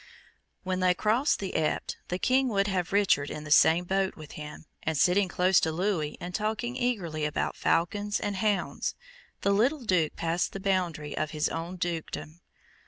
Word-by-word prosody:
When 185 -1 -1
they 180 -1 +3
crossed 225 +9 +2
the 195 -2 -5
Epte, 155 -1 0
the 180 - -2
King 260 +6 +2
would 200 -4 +1
have 185 -3 -1
Richard 195 -8 +3
in 150 - -6
the 155 - -8
same 165 +3 +6
boat 190 +1 0
with 155 -2 -11
him, 150 +1 -9 0.2
and 160 -1 -1
sitting 185 +6 +4
close 185 +1 +3
to 160 - 0
Louis, 170 -3 -1
and 180 +1 -6
talking 220 +4 -2
eagerly 200 -12 -1
about 150 0 -1
falcons 205 +5 0
and 205 -2 -2
hounds, 205 0 -1 0.5
the 200 - +2
little 250 +8 +2
Duke 175 -6 +1
passed 170 +1 -1
the 195 - -5
boundary 180 -6 -1
of 155 - -1
his 155 -1 -1
own 165 +3 -4
dukedom. 170 -1 -4
185 Hz, 175 wpm, -28 LUFS, 160-205 Hz, 0.5 s, same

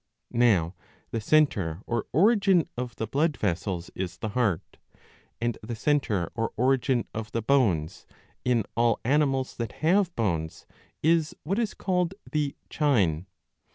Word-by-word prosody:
Now 100 -8 +3 0.4
the 115 - -2
centre 105 - +2
or 120 -2 -2
origin 195 - +4
of 125 -1 -4
the 110 - -3
blood 145 +7 0
vessels 90 -2 -2
is 90 -2 -4
the 110 - -4
heart, 105 -7 -1 0.6
and 120 0 -1
the 115 +2 -5
centre 110 - 0
or 115 -1 -2
origin 130 0 +2
of 110 0 -5
the 115 - -1
bones, 105 - +1 0.4
in 120 -3 +2
all 115 -1 +2
animals 135 -1 +1
that 115 -3 -4
have 180 +1 +3
bones, 85 -8 -2 0.4
is 160 -1 +2
what 195 +8 -1
is 225 -3 -1
called 180 -1 0 0.2
the 150 -3 -1
chine. 100 - +1
120 Hz, 140 wpm, -27 LUFS, 105-150 Hz, 0.6 s, origin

